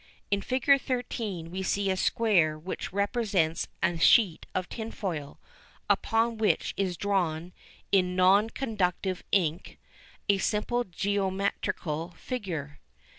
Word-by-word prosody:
In 200 0 +2
Fig. 265 +4 +3
13 220 -9 -3
we 190 +1 -3
see 195 +1 0
a - - +1
square 185 -6 +2
which 165 +5 -5
represents 200 -5 0 0.2
a 175 -3 +1
sheet 190 -2 +4
of 185 -1 -1
tinfoil, 190 -10 -5 0.5
upon 225 0 +1
which 215 - +1
is 185 -3 -1
drawn, 175 -4 -1 0.4
in 180 -2 +3
non 195 +4 +5
conductive 190 -7 -1
ink, 170 -2 0 0.5
a 200 -1 +3
simple 235 +5 0
geometrical 190 -4 -2
figure. 170 - -5
195 Hz, 115 wpm, -28 LUFS, 175-215 Hz, 0.5 s, non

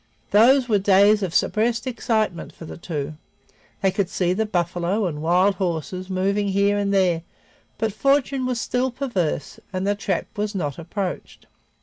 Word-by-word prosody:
Those 245 +5 +5
were 210 -4 +3
days 200 +2 +5
of 190 -4 -2
suppressed 230 +6 +1
excitement 220 -7 -1
for 165 - -10
the - - -8
two; 155 -3 -5 0.7
they 190 - +4
could 195 -2 -1
see 180 -2 0
the 220 +3 -1
buffalo 180 +2 0
and 150 -4 -3
wild 180 +5 +3
horses 180 +1 -3
moving 200 +2 0
here 200 +1 +2
and 200 -1 0
there, 185 -4 +2 0.6
but 220 -2 -1
fortune 275 +2 +1
was 250 -2 -1
still 250 +2 0
perverse 215 - -3
and 185 0 -2
the 205 - +2
trap 195 -3 -2
was 210 0 -2
not 145 -6 -3
approached. 180 +3 -5
200 Hz, 160 wpm, -23 LUFS, 180-220 Hz, 0.7 s, Those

